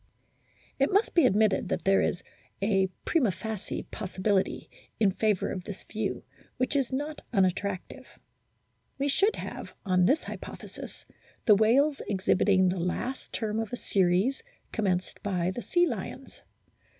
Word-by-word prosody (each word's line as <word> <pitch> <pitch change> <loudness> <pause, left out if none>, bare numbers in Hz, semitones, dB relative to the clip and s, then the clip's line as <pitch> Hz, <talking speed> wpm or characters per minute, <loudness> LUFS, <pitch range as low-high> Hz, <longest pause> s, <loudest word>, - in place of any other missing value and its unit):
It 275 - +3
must 405 +4 +2
be 335 -7 +6
admitted 215 -1 +2
that - - -1
there 195 0 +5
is - - -1 0.4
a 195 -1 +2 0.2
prima 290 -10 +3
facie 210 +3 -5
possibility 195 0 -1 0.3
in 205 -3 +4
favour 210 0 +1
of 185 - -4
this 200 -4 -7
view, 220 - -3 0.3
which 255 +3 0
is 270 -3 +1
not 290 +3 -3
un 195 -1 +4
attractive. 185 +1 -4 0.8
We 275 +1 0
should 395 +10 +3
have - - -7
on 185 -2 +3
this 290 - +3
hypothesis - - -9 0.4
the 215 - +8
whales 260 +8 +4
exhibiting 190 -1 +3
the 180 0 -1
last 240 +9 -3
term 220 -1 -2
of 225 -2 -3
a 245 - -3
series 195 +7 +2 0.3
commenced 185 -4 -1
by 185 -3 0
the 240 - -5
sea 350 +6 +3
lions. 260 - -6
210 Hz, 145 wpm, -28 LUFS, 190-260 Hz, 0.8 s, the